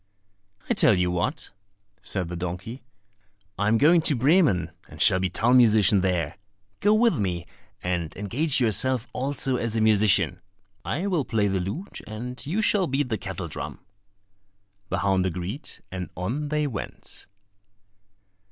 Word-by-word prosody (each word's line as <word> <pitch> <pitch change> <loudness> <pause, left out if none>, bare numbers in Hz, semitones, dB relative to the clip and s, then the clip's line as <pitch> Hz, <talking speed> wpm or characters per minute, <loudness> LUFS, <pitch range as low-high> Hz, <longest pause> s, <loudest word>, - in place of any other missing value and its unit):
"I - - +2
tell 110 - +4
you 90 0 +1
what," 90 -1 -2 0.5
said 95 -4 -2
the 90 - -5
donkey, 90 +8 -5 0.8
"I 100 - +1
am 110 +2 +4
going 160 +6 +5
to 155 -2 +2
Bremen, 130 - +3 0.2
and - - -12
shall 95 - +5
be 95 0 0
town 120 +7 +3
musician 105 -5 +5
there; 90 -3 -1 0.4
go 205 - +3
with 225 - +3
me 90 -4 -2 0.4
and 90 -3 -2
engage 130 +9 0
yourself 125 +2 +3
also 135 0 -1
as 115 -2 -2
a - - +1
musician. 100 -5 +3 0.4
I 170 +8 -2
will 180 -7 +1
play 110 -5 0
the 95 -1 0
lute, 125 - -5
and 120 +4 -6
you 190 +10 -1
shall 200 -4 +2
beat 135 0 -1
the 110 - -1
kettledrum." 95 -5 -6 1.1
The 95 - -1
hound 95 -1 +2
agreed, 90 - -5 0.2
and 90 -1 -5
on 125 +12 -3
they 150 0 0
went. 120 -9 -6
110 Hz, 150 wpm, -25 LUFS, 95-140 Hz, 1.1 s, going